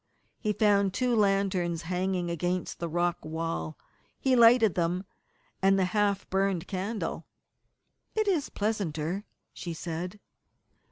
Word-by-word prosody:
He 215 Hz, -, 0 dB
found 200 Hz, -2 st, +3 dB
two 250 Hz, -2 st, +2 dB
lanterns 195 Hz, -5 st, +1 dB
hanging 180 Hz, 0 st, -1 dB
against 175 Hz, +2 st, -2 dB
the 170 Hz, -, -3 dB
rock 175 Hz, +1 st, 0 dB
wall. 155 Hz, -, -3 dB, 0.4 s
He 265 Hz, -1 st, +3 dB
lighted 230 Hz, -4 st, +6 dB
them, 175 Hz, +2 st, 0 dB, 0.6 s
and 195 Hz, 0 st, +4 dB
the 190 Hz, -, +3 dB
half 205 Hz, -2 st, +1 dB
burned 190 Hz, -3 st, +1 dB
candle. 200 Hz, +3 st, -3 dB, 0.9 s
"It 435 Hz, -1 st, +1 dB
is 345 Hz, -8 st, +1 dB
pleasanter," 195 Hz, -3 st, -2 dB, 0.3 s
she 170 Hz, -2 st, -6 dB
said. 175 Hz, +5 st, -5 dB
190 Hz, 120 wpm, -29 LUFS, 170-210 Hz, 0.9 s, lighted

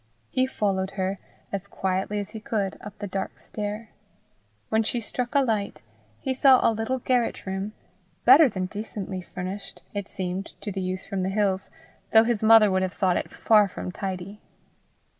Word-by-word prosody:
He 255 Hz, 0 st, +2 dB
followed 195 Hz, -6 st, 0 dB
her, 190 Hz, 0 st, -1 dB, 0.3 s
as 200 Hz, 0 st, -4 dB
quietly 190 Hz, +1 st, -1 dB
as 205 Hz, 0 st, -4 dB
he 220 Hz, -, -6 dB
could, 205 Hz, -3 st, -2 dB
up 205 Hz, 0 st, -9 dB
the 205 Hz, -, -5 dB
dark 195 Hz, 0 st, -4 dB
stair. 210 Hz, +1 st, -5 dB, 0.8 s
When 220 Hz, 0 st, +3 dB
she 230 Hz, +2 st, 0 dB
struck 245 Hz, +4 st, -4 dB
a 280 Hz, -, +6 dB
light, 215 Hz, -, -1 dB, 0.4 s
he 265 Hz, -, -1 dB
saw 260 Hz, 0 st, +6 dB
a 230 Hz, -, +3 dB
little 225 Hz, +4 st, -1 dB
garret 250 Hz, -1 st, 0 dB
room 195 Hz, +2 st, -3 dB, 0.5 s
better 295 Hz, -1 st, +9 dB
than 185 Hz, -4 st, -2 dB
decently 200 Hz, -1 st, -5 dB
furnished, 185 Hz, +3 st, -7 dB
it 205 Hz, -2 st, -3 dB
seemed 185 Hz, +1 st, -5 dB
to 205 Hz, -, -4 dB
the 190 Hz, 0 st, -3 dB
youth 185 Hz, 0 st, -3 dB
from 195 Hz, -1 st, -3 dB
the 185 Hz, -, 0 dB
hills, 195 Hz, -1 st, 0 dB, 0.4 s
though 220 Hz, 0 st, +8 dB
his 230 Hz, -2 st, 0 dB
mother 220 Hz, -2 st, +7 dB
would 185 Hz, 0 st, +2 dB
have 185 Hz, 0 st, -1 dB
thought 185 Hz, -2 st, +2 dB
it -, -, -2 dB
far 210 Hz, -2 st, +4 dB
from 185 Hz, -, -6 dB
tidy. 195 Hz, +1 st, -5 dB
205 Hz, 180 wpm, -26 LUFS, 190-220 Hz, 0.8 s, better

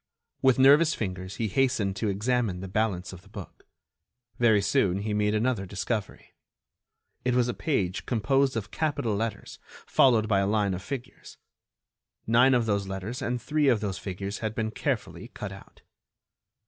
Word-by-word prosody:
With 130 Hz, -2 st, +4 dB
nervous 145 Hz, +4 st, +6 dB
fingers 95 Hz, -2 st, -5 dB
he 115 Hz, -, -1 dB
hastened 110 Hz, -4 st, +1 dB
to 105 Hz, +2 st, -1 dB
examine 105 Hz, -1 st, 0 dB
the 95 Hz, -, -6 dB
balance 95 Hz, -3 st, -1 dB
of 90 Hz, -, -10 dB
the 100 Hz, -, -20 dB
book. 100 Hz, -3 st, -11 dB, 0.7 s
Very 110 Hz, -3 st, +5 dB
soon 100 Hz, -1 st, +1 dB
he 105 Hz, 0 st, -2 dB
made 105 Hz, 0 st, +1 dB
another 110 Hz, -3 st, 0 dB
discovery. 105 Hz, +2 st, -4 dB, 0.9 s
It 125 Hz, 0 st, +1 dB
was 125 Hz, -1 st, +3 dB
a 120 Hz, -, -1 dB
page 100 Hz, -, -2 dB
composed 130 Hz, +2 st, +1 dB
of 105 Hz, -1 st, -5 dB
capital 145 Hz, -9 st, -1 dB
letters, 110 Hz, 0 st, -4 dB, 0.3 s
followed 115 Hz, -5 st, +4 dB
by 100 Hz, -2 st, +3 dB
a 95 Hz, -, +1 dB
line 105 Hz, -2 st, +1 dB
of 90 Hz, -, -4 dB
figures. 130 Hz, +2 st, -8 dB, 0.9 s
Nine 125 Hz, +4 st, +5 dB
of 120 Hz, -2 st, +2 dB
those 100 Hz, -2 st, 0 dB
letters 95 Hz, +6 st, -5 dB
and 125 Hz, +1 st, -1 dB
three 150 Hz, +2 st, 0 dB
of 120 Hz, -5 st, +4 dB
those 100 Hz, -3 st, -3 dB
figures 100 Hz, +1 st, -5 dB
had 110 Hz, -1 st, -3 dB
been 110 Hz, -1 st, -2 dB
carefully -, -, -3 dB
cut -, -, -5 dB
out. -, -, -14 dB
110 Hz, 165 wpm, -27 LUFS, 100-125 Hz, 0.9 s, nervous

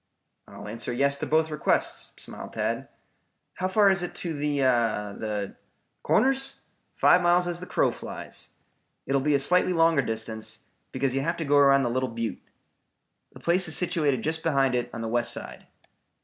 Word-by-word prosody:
"I'll -, -, -10 dB
answer 115 Hz, +1 st, -4 dB
yes 140 Hz, +3 st, +1 dB
to -, -, -4 dB
both, 160 Hz, 0 st, +2 dB
requests," 150 Hz, -, 0 dB
smiled -, -, -8 dB
Tad. -, -, -2 dB, 0.7 s
"How 185 Hz, -, -1 dB
far 200 Hz, +1 st, +4 dB
is 190 Hz, -1 st, +1 dB
it 175 Hz, -, -5 dB
to 170 Hz, -2 st, -4 dB
the 145 Hz, 0 st, -2 dB
the 110 Hz, -5 st, -1 dB, 0.3 s
" -, -, -48 dB
"Corners? 270 Hz, +1 st, +1 dB, 0.3 s
Five -, -, +5 dB
miles 175 Hz, 0 st, +3 dB
as 175 Hz, 0 st, -3 dB
the 180 Hz, -, -8 dB
crow -, -, +1 dB
flies. -, -, -6 dB, 0.6 s
It 135 Hz, -, -2 dB
will 140 Hz, -, +3 dB
be 145 Hz, +1 st, +2 dB
a -, -, +5 dB
slightly 180 Hz, +6 st, +3 dB
longer 165 Hz, -3 st, +4 dB
distance, 110 Hz, -2 st, -4 dB, 0.3 s
because 135 Hz, -2 st, -1 dB
you 135 Hz, -, 0 dB
have 165 Hz, +4 st, -1 dB
to 165 Hz, -, -3 dB
go 145 Hz, 0 st, +3 dB
around 140 Hz, -1 st, +5 dB
the 120 Hz, -, -1 dB
Little 130 Hz, +1 st, -1 dB
Butte. 115 Hz, -1 st, -4 dB, 0.9 s
The -, -, -12 dB
place 180 Hz, +2 st, +2 dB
is 160 Hz, -, +5 dB
situated 155 Hz, -8 st, 0 dB
just 160 Hz, +1 st, -1 dB
behind 135 Hz, -5 st, +1 dB
it 120 Hz, 0 st, -1 dB
on 115 Hz, -, -6 dB
the 115 Hz, -, -3 dB
west 120 Hz, +1 st, +1 dB
side." -, -, -5 dB
140 Hz, 185 wpm, -26 LUFS, 120-170 Hz, 0.9 s, Five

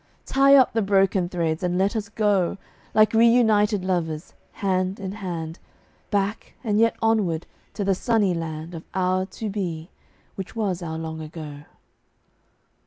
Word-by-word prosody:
Tie 275 Hz, +1 st, +5 dB
up 260 Hz, -2 st, +5 dB
the 225 Hz, -, +2 dB
broken 195 Hz, -2 st, +2 dB
threads 165 Hz, -3 st, -1 dB
and 180 Hz, -1 st, 0 dB
let 195 Hz, +4 st, +1 dB
us 210 Hz, -2 st, -3 dB
go, 205 Hz, -4 st, +1 dB, 0.4 s
Like 215 Hz, 0 st, +5 dB
reunited 220 Hz, -4 st, +4 dB
lovers, 165 Hz, -3 st, -2 dB, 0.2 s
hand 185 Hz, 0 st, -1 dB
in 190 Hz, -1 st, -4 dB
hand, 175 Hz, -5 st, -5 dB, 0.5 s
Back, 205 Hz, +1 st, -2 dB
and 210 Hz, -3 st, +1 dB
yet 230 Hz, 0 st, +4 dB
onward, 205 Hz, -8 st, +1 dB, 0.3 s
to 205 Hz, -, -2 dB
the 195 Hz, 0 st, +2 dB
sunny 205 Hz, -1 st, +1 dB
land 165 Hz, 0 st, -5 dB
Of 165 Hz, -1 st, -7 dB
our 185 Hz, 0 st, +1 dB
To 220 Hz, +3 st, -6 dB
Be, 175 Hz, -5 st, -4 dB, 0.4 s
which 195 Hz, +2 st, -7 dB
was 195 Hz, -5 st, -1 dB
our 160 Hz, -2 st, -4 dB
Long 160 Hz, 0 st, -5 dB
Ago. 150 Hz, -2 st, -8 dB
190 Hz, 150 wpm, -24 LUFS, 170-210 Hz, 0.5 s, Tie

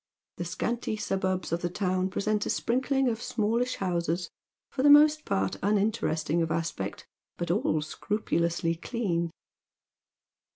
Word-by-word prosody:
The 175 Hz, -, -3 dB
scanty 215 Hz, +5 st, -2 dB
suburbs 190 Hz, -3 st, -1 dB
of 170 Hz, +1 st, 0 dB
the 175 Hz, -, -1 dB
town 185 Hz, 0 st, 0 dB
present 210 Hz, +2 st, 0 dB
a -, -, -2 dB
sprinkling 265 Hz, +2 st, +1 dB
of 230 Hz, -1 st, -1 dB
smallish 235 Hz, +3 st, 0 dB
houses, 175 Hz, -1 st, -1 dB, 0.4 s
for -, -, -2 dB
the 290 Hz, -, +6 dB
most 300 Hz, +1 st, +7 dB
part 95 Hz, 0 st, 0 dB
unin 205 Hz, +1 st, +3 dB
teresting 160 Hz, -5 st, 0 dB
of 165 Hz, -, 0 dB
aspect, 160 Hz, -12 st, -3 dB, 0.3 s
but 175 Hz, -1 st, -2 dB
all 155 Hz, -5 st, +1 dB
scrupulously 170 Hz, -1 st, -1 dB
clean. 170 Hz, -2 st, -2 dB
185 Hz, 135 wpm, -28 LUFS, 170-230 Hz, 0.4 s, most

